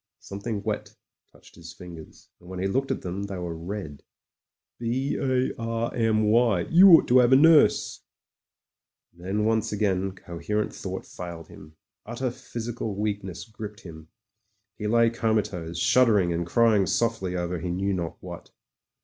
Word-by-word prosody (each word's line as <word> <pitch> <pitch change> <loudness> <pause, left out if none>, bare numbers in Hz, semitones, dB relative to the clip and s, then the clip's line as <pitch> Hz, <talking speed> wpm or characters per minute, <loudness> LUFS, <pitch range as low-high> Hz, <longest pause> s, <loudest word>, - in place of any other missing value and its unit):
Something 100 +1 -5
wet - - -4 0.4
touched - - -20
his 85 -1 -12
fin 90 -2 -11
gers, 80 -1 -14
and 90 - -16
when 95 - -7
he 95 - -2
looked 135 +8 -1
at - - -3
them, 90 +2 -4
they 100 -1 -5
were 85 -2 -5
red. 85 -3 -7 0.8
"B 125 +4 -1
A 130 -1 0
R 115 0 -2
M 110 -2 +1
Y. 110 -3 +3
You 185 +4 +8
ought 165 - +7
to 125 +1 +6
'ave 125 +2 +5
a - - +6
nurse... 160 0 +4 0.6
." - - -61
Then 100 +4 -2
once 110 -1 +1
again 95 -2 0
coherent 100 +4 -4
thought 95 0 -6
failed 85 -2 -9
him 75 +1 -14 0.2
— - - -63
utter 120 +2 -3
physical 115 -3 -6
weakness 100 -3 -4
gripped 105 -3 -9
him 80 -3 -11 0.4
— - - -49
^he 105 - -2
lay 115 0 +4
coma 110 -2 +1
tose, 85 -4 -7
shuddering, 105 -3 +3
and 85 0 -3
crying 110 -2 +3
softly 115 -6 -1
over 90 0 -3
he 90 +2 -4
knew 95 +3 -1
not 85 -3 -4
what. - - -9
105 Hz, 170 wpm, -25 LUFS, 90-115 Hz, 0.8 s, You